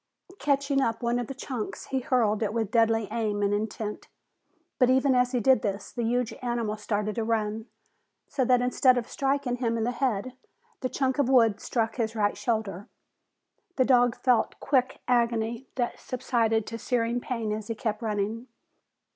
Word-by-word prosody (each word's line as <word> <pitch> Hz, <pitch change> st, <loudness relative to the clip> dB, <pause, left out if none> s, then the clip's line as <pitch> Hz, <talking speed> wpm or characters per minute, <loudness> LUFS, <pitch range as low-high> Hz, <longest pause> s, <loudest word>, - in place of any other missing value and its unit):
Catching 280 Hz, -1 st, +1 dB
up 230 Hz, -1 st, -1 dB
one 240 Hz, +1 st, +1 dB
of 240 Hz, -, -3 dB
the 270 Hz, -, -6 dB
chunks, 250 Hz, -4 st, -5 dB
he 265 Hz, -, 0 dB
hurled 235 Hz, -5 st, +1 dB
it 210 Hz, -1 st, 0 dB
with 225 Hz, -3 st, -1 dB
deadly 225 Hz, -2 st, +3 dB
aim 215 Hz, -3 st, -1 dB
and 200 Hz, 0 st, +2 dB
intent. 210 Hz, 0 st, -3 dB, 0.7 s
But 250 Hz, -2 st, +5 dB
even 265 Hz, +1 st, +4 dB
as 250 Hz, 0 st, +3 dB
he 250 Hz, -, +1 dB
did 260 Hz, +3 st, +4 dB
this, 200 Hz, -3 st, -3 dB
the 240 Hz, -, -4 dB
huge 245 Hz, +1 st, 0 dB
animal 240 Hz, -3 st, -1 dB
started 210 Hz, 0 st, -2 dB
to 230 Hz, -, -2 dB
run, 220 Hz, 0 st, -1 dB, 0.6 s
so 265 Hz, -, 0 dB
that 250 Hz, 0 st, +3 dB
instead 250 Hz, 0 st, +4 dB
of 240 Hz, -1 st, -2 dB
striking 275 Hz, -2 st, -1 dB
him 230 Hz, -2 st, 0 dB
in 225 Hz, -, -1 dB
the 240 Hz, -, 0 dB
head, 245 Hz, -2 st, -1 dB, 0.5 s
the 255 Hz, -, -2 dB
chunk 265 Hz, +1 st, -1 dB
of 270 Hz, -3 st, +2 dB
wood 230 Hz, -5 st, +4 dB
struck 225 Hz, -1 st, -1 dB
his 225 Hz, -2 st, -1 dB
right 205 Hz, -2 st, +1 dB
shoulder. 210 Hz, -5 st, -2 dB, 0.9 s
The 255 Hz, -, +3 dB
dog 245 Hz, -2 st, +4 dB
felt 250 Hz, -3 st, +1 dB
quick 260 Hz, -2 st, +1 dB
agony 235 Hz, 0 st, +1 dB
that 245 Hz, -2 st, -2 dB
subsided 230 Hz, -3 st, 0 dB
to 230 Hz, 0 st, -6 dB
searing 235 Hz, -1 st, 0 dB
pain 230 Hz, -4 st, -3 dB
as 210 Hz, 0 st, -4 dB
he 230 Hz, -, -3 dB
kept 215 Hz, -1 st, -3 dB
running. 220 Hz, +2 st, -2 dB
235 Hz, 180 wpm, -27 LUFS, 220-250 Hz, 0.9 s, But